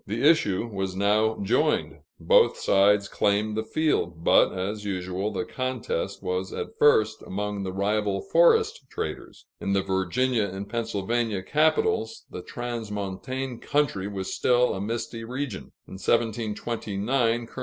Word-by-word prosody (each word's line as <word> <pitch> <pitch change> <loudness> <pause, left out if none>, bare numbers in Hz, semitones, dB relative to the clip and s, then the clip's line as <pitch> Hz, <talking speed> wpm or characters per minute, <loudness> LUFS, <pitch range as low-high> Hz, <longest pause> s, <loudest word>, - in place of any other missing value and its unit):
The 115 +8 +1
issue 115 - +3
was 95 -4 -4
now 105 +3 +2
joined; 95 - +1 0.2
both - - +4
sides 100 +1 +3
claimed 105 +2 0
the 110 - -1
field, 110 - -1
but, - - +5
as 100 +3 -4
usual, 95 +1 -3
the 105 +2 -3
contest 115 -6 -3
was 90 0 -2
at - - -5
first 110 -7 +4
among 105 +1 -4
the 95 -1 -3
rival 100 +1 0
forest 460 -2 +3
traders. 440 - -6
In 100 - -1
the 100 -1 +2
Virginia 100 +5 +1
and 95 +1 -6
Pennsylvania 115 -2 -1
capitals, 150 -6 +1
the 90 - -6
transmontane 120 +3 -5
country 140 -10 0
was 95 -2 -4
still 125 0 +3
a 95 - -4
misty 115 +2 -4
region. 125 -2 -4 0.2
In 95 - -9
1729, 115 +1 0
Col. - - -19
105 Hz, 135 wpm, -26 LUFS, 100-120 Hz, 0.2 s, but